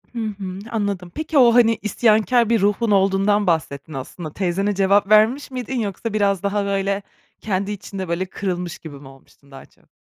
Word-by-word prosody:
Hı - - -3
hı, 195 -3 -6
anladım. 200 -5 -3
Peki 315 -1 -2
o 240 -3 +6
hani 230 -2 +4
isyankâr 220 +2 +2
bir 230 -3 +2
ruhun 210 +3 +1
olduğundan 195 +1 +2
bahsettin 155 -3 -1
aslında. 150 +4 -7
Teyzene 195 +2 -1
cevap 200 +1 +3
vermiş 225 +7 +4
miydin, 255 0 -4
yoksa 210 +1 -4
biraz 200 -3 +1
daha 200 0 0
böyle 195 0 -1 0.4
kendi 200 0 -2
içinde, 195 -2 -6
böyle 170 +2 -1
kırılmış 180 -3 -4
gibi 155 -3 -10
mi 140 - -13
olmuştun 135 +1 -19
daha 135 - -11
çok? - - -30
200 Hz, 175 wpm, -21 LUFS, 185-215 Hz, 0.4 s, o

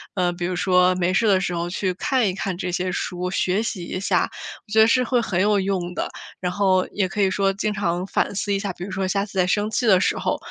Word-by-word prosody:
呃， 180 -2 +1
比 175 0 -4
如 180 +1 -2
说 180 0 +3
没 180 0 0
事 225 - +2
的 195 -2 +4
时 185 -1 -2
候 170 0 -2
去 185 +1 -1
看 245 +5 +1
一 185 - -1
看 190 -1 -3
这 180 0 -3
些 180 +1 -1
书， 180 0 -3
学 190 +3 0
习 205 -6 -4
一 185 - -4
下， 195 - +1 0.4
我 - - -17
觉 220 - +3
得 220 - +7
是 250 +2 +3
会 245 0 +1
很 190 -6 -1
有 205 0 +3
用 190 -2 -2
的。 - - -3 0.3
然 180 -1 -2
后 185 -1 +2
也 200 -2 0
可 205 +3 -3
以 190 -1 +3
说 195 0 +1
经 210 +2 -2
常 180 -3 -1
反 200 - -1
思 200 +1 -1
一 195 - 0
下， 200 -2 -3
比 175 - -8
如 190 - -6
说 190 0 -1
下 195 +1 0
次 200 -2 -10
在 180 -1 +3
生 205 +3 +1
气 245 - 0
的 190 -4 +5
时 - - +1
候， - - -1
190 Hz, 295 characters per minute, -23 LUFS, 180-205 Hz, 0.4 s, 得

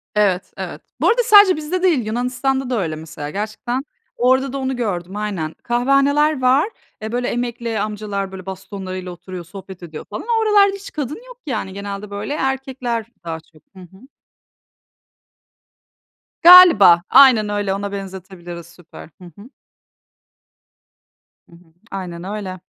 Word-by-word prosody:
Evet, 200 -3 +1
evet. - - -6 0.2
Bu - - +3
arada 480 +2 +3
sadece 410 -3 +7
bizde 310 +4 -3
değil, 315 -11 +2
Yunanistan'da 250 +3 -1
da 245 -3 0
öyle 160 -3 -3
mesela, 155 -2 -8
gerçekten 220 - -4 0.3
orada 260 +2 +2
da - - -3
onu 265 -1 -2
gördüm, 195 -6 -3
aynen. 195 -7 -3
Kahvehaneler 275 +4 +2
var, 260 +9 +3 0.3
eee, 220 +1 -5
böyle 245 +1 -1
emekli 235 -2 -3
amcalar 205 -2 -4
böyle, 190 -1 -9
bastonlarıyla 190 -1 -7
oturuyor, 180 0 -9
sohbet 190 +1 -11
ediyor 160 -3 -9
falan. 210 - -6
O 465 -1 +2
oralarda 405 -2 +4
hiç 395 0 -10
kadın 290 -1 -4
yok, - - -13
yani, 215 -9 -4
genelde 200 +1 -6
böyle 205 +7 -5
erkekler 265 -4 -2 0.2
daha 165 -1 -5
çok. 160 -1 -24
Hı - - -13
hı. 190 +7 -15 2.3
Galiba, 335 - +9
aynen 250 -6 +6
öyle, 205 -2 -1
ona 200 +1 -4
benzetebiliriz, 185 -3 -8
süper. 170 -2 -14
Hı - - -11
hı. 210 +6 -14 2.0
Hı 170 - -17
hı. 170 -1 -22 0.2
Aynen 180 -3 -6
öyle. 190 -1 -6
210 Hz, 145 wpm, -19 LUFS, 185-265 Hz, 2.3 s, Galiba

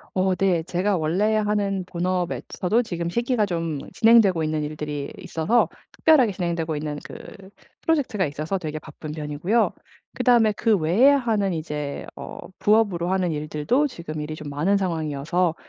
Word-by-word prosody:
어 185 0 +2
네 185 -4 +2
제가 185 +4 0
원래 185 +7 +1
하는 205 -2 0
본업에서도 180 +4 -1
지금 170 -5 -3
시기가 235 +1 0
좀 165 -5 -2
진행되고 220 -7 +5
있는 155 0 -1
일들이 150 -1 -4
있어서 170 +10 +1 0.2
특별하게 270 -9 +4
진행되고 170 -4 -2
있는 150 0 -4
그 - - -10 0.7
프로젝트가 270 -11 +1
있어서 155 +6 -3
되게 155 -3 -4
바쁜 155 0 -9
편이고요. 155 +9 0 0.4
그다음에 235 -4 +4
그 220 +1 +2
외에 180 - +4
하는 225 -8 +2
이제 150 -3 -4
어 - - -8 0.2
부업으로 200 -5 +2
하는 185 -3 +1
일들도 155 - 0
지금 170 - -6
일이 155 +1 -5
좀 150 -2 -8
많은 170 +8 +2
상황이어서 165 -1 -1
180 Hz, 350 characters per minute, -24 LUFS, 155-210 Hz, 0.7 s, 진행되고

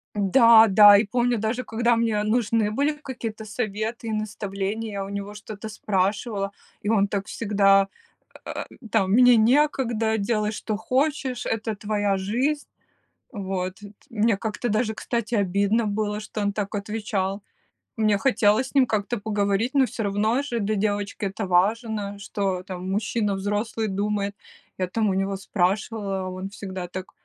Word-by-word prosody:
Да, 225 +2 +6
да! 205 +1 +9
И 215 - +2
помню, 240 +2 +1
даже 225 +4 -1
когда 235 +1 +1
мне 225 -2 +1
нужны 220 -1 +1
были 285 +6 +1
какие-то 235 -7 -7
советы 215 +1 -3
и 220 - -2
наставления, 210 0 -3
я 195 -1 -3
у 195 - -8
него 200 0 -5
что-то 210 +1 -8
спрашивала, 200 0 -1 0.3
и 205 - -1
он 205 -3 +3
так 200 -1 -3
всегда, 195 -3 +3 0.6
э, - - -5 0.3
там: 190 -1 +2
"Мне 245 +2 +7
некогда, 235 -3 +2
делай, 215 0 0
что 215 -1 -3
хочешь, 260 +2 -1
это 220 0 -2
твоя 205 -1 0
жизнь". 255 +10 -1 0.7
Вот 190 -4 -3
т 205 -1 -13 0.2
мне 220 -2 +1
как-то 220 +2 -3
даже, 220 +1 0
кстати, 235 +1 -3
обидно 200 +3 +2
было, 210 0 -1
что 215 0 -6
он 205 -1 0
так 205 0 -3
отвечал. 205 -2 -2 0.6
Мне 215 -2 +3
хотелось 220 0 +2
с - - -19
ним 265 -3 +5
как-то 215 +2 -1
поговорить, 205 +3 0
но 270 -2 +4
всё 230 - -5
равно 210 +5 +1
же 240 -5 -3
для 215 +1 0
девочки 205 0 -1
это 195 +2 -3
важно, 205 +2 0
что, 195 -3 -2
там, 185 0 -6
мужчина 210 +1 0
взрослый 210 +3 -2
думает. 200 +1 -1 0.4
Я, 185 -1 -1
там, 215 +2 0
у - - +1
него 195 +1 -1
спрашивала, 195 0 -1
он 185 +1 -6
всегда 190 -3 -6
так: 185 +1 -7
210 Hz, 155 wpm, -24 LUFS, 200-225 Hz, 0.7 s, да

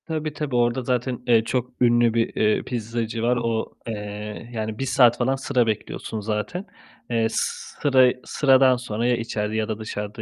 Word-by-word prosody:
Tabii, 155 -2 -3
tabii. 150 -4 -3
Orada 120 +1 +2
zaten, 125 0 -1
eee, 115 -2 +5
çok 125 +1 -2
ünlü 120 -1 +4
bir, 115 0 0
eee, 110 0 +2
pizzacı 115 -1 -3
var. 120 +1 +2
O, 115 -1 -2
eee, 105 +1 -6
yani, 110 -1 -4
1 135 - -1
saat 125 -2 +4
falan 130 +2 +1
sıra 125 -3 +1
bekliyorsun 110 0 -3
zaten. 105 - -3 0.4
Eee, 115 -1 +2
sıra 130 0 +2
sıradan 135 -2 +4
sonra 115 -2 -3
ya 125 - +3
içeride 110 -2 -3
ya 110 -1 0
da 110 -1 -4
dışarıda 105 0 -5
120 Hz, 170 wpm, -23 LUFS, 110-125 Hz, 0.4 s, eee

